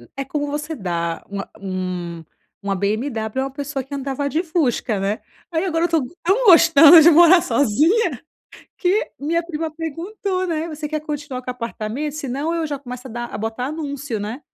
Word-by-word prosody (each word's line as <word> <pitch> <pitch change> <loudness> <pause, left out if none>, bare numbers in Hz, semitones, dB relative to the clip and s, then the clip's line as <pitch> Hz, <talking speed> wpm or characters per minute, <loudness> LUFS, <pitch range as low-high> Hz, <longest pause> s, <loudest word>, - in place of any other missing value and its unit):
é 275 - -3
como 290 +2 -2
você 295 +2 -4
dar 170 - -3
uma 200 0 -5
um 185 -3 -4 0.4
uma 200 0 -1
BMW 220 +4 -2
a - - -1
uma 270 - -5
pessoa 280 0 -4
que 270 +3 -11
andava 280 0 -2
de 310 +5 0
Fusca, 260 - 0
né? 200 +3 -2 0.3
Aí, 325 -2 -1
agora 335 -3 +1
eu - - +2
tô 325 -3 +2 0.2
tão 390 +8 +2
gostando 330 -3 +9
de 325 - +8
morar 345 +2 +7
sozinha, 320 - +2 0.6
que 385 +4 +1
minha 330 +4 0
prima 325 -1 -3
perguntou, 365 +4 -3
né: 325 -1 -2
“Você 305 -1 -5
quer 310 0 -2
continuar 290 -4 -5
com 250 - -5
apartamento? 240 +3 -4
Senão, 290 +2 -3
eu 335 -1 -1
já 290 -2 -4
começo 250 -1 -8
a - - -10
dar 240 +1 -4
a - - -3
botar 225 +3 -3
anúncio, 285 -6 -4
né?” 215 +6 -5
285 Hz, 185 wpm, -21 LUFS, 235-325 Hz, 0.6 s, gostando